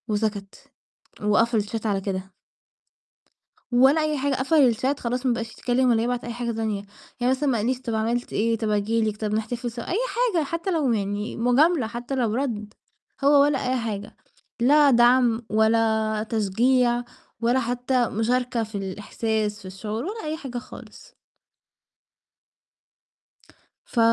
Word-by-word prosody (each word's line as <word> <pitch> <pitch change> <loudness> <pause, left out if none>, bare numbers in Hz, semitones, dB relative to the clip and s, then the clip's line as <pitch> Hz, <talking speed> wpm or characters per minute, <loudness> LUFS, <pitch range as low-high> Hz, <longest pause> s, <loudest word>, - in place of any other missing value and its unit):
وسكت، 210 -2 -3 0.5
وقفل 220 +2 +2
الchat 220 +2 -5
على 200 -3 0
كده. 190 -1 -4 1.4
ولا 265 +6 +5
أي 305 -1 0
حاجة، 275 0 0
قفل 265 -2 +3
الchat 265 +5 -1
خلاص 250 +2 -3
ما 250 - +3
بقاش 230 -1 -4
يتكلّم 250 +2 +1
ولا 225 -1 +3
يبعت 245 +1 -2
أي 240 - -5
حاجة 240 0 -3
تانية، 220 -3 -2 0.4
يعني 245 +1 +2
مثلًا 275 +2 0
ما 245 - +1
قال 215 +2 -1
ليش 255 0 -1
طَب 230 -3 -3
عملت 230 +2 -1
إيه، 230 +2 +1
طَب 220 -1 -2
آجي 210 +2 +1
لِك، 215 -1 -1
طَب 210 -1 -2
نحتفل 235 +2 -2
سوا، 235 0 -6
أي 365 - +1 0.4
حاجة 330 -3 +2
حتّى 335 +6 -3
لو 305 -7 +1
يعني 205 0 -2
مجاملة 255 +3 +3
حتّى 240 +3 -5
لو 235 -4 0
رَد، 220 -6 -3 0.5
هو 285 0 +6
ولا 285 -2 +2
أي 260 - +1
حاجة، 210 -3 -5 0.5
لا 285 +3 +5
دعم 240 -1 +4
ولا 220 0 +2
تشجيع 240 +3 +2 0.4
ولا 240 +3 +2
حتّى 245 0 0
مشاركة 240 +2 0
في 215 -1 -9
الإحساس 210 +2 -3
في - - -14
الشعور، 210 +4 -5
ولا 430 +2 -5
أي 310 +1 -3
حاجة 265 -5 -6
خالص. 240 - -11 2.7
ف 240 - -3
235 Hz, 155 wpm, -24 LUFS, 215-255 Hz, 2.7 s, هو